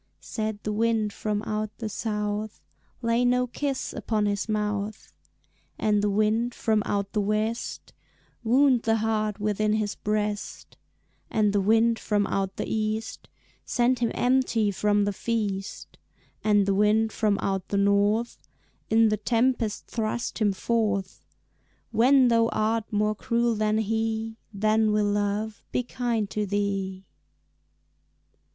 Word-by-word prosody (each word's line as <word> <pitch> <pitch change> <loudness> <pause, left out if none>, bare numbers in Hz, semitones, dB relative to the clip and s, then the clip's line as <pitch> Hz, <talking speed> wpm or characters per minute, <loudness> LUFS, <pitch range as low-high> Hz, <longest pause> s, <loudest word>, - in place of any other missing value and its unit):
Said 220 -2 -4
the 210 - -2
wind 220 -1 +1
from 210 -1 -2
out 215 0 -3
the 225 - -4
south, 210 0 -3 0.4
"Lay 230 +1 +2
no 250 0 +3
kiss 270 +2 -3
upon 215 -2 -1
his 205 +1 -1
mouth," 210 0 -2 0.6
And 210 -1 +2
the 205 - +1
wind 215 +4 +1
from 220 -1 +1
out 200 -1 -1
the 210 - +1
west, 215 +3 -2 0.5
"Wound 255 +1 +4
the 225 -1 +2
heart 215 -1 -1
within 210 0 0
his 215 -1 0
breast," 210 0 -3 0.5
And 210 -2 +2
the 205 - +2
wind 225 +3 +3
from 205 -1 0
out 195 0 -2
the - - -3
east, 220 0 -3 0.3
"Send 245 0 +1
him 235 -1 +1
empty 245 -4 +2
from 205 +1 +1
the 205 - -1
feast," 205 -3 -3 0.4
And 205 -2 +3
the 200 - +1
wind 210 +2 +3
from 210 -3 +1
out 195 -2 -2
the 200 - -1
north, 205 +3 +2 0.5
"In 225 0 +5
the 215 - +1
tempest 230 0 0
thrust 230 +1 -3
him 210 -2 +3
forth; 205 -2 -1 0.7
When 255 +4 +5
thou 230 -1 +4
art 220 0 -1
more 210 0 +1
cruel 235 +1 0
than 215 0 +1
he, 220 +1 -1
Then 215 +1 +2
will 210 0 +2
Love 205 +1 -2
be 250 - 0
kind 235 -3 -2
to 210 -1 -2
thee." 195 -1 -2
215 Hz, 140 wpm, -26 LUFS, 205-225 Hz, 0.7 s, In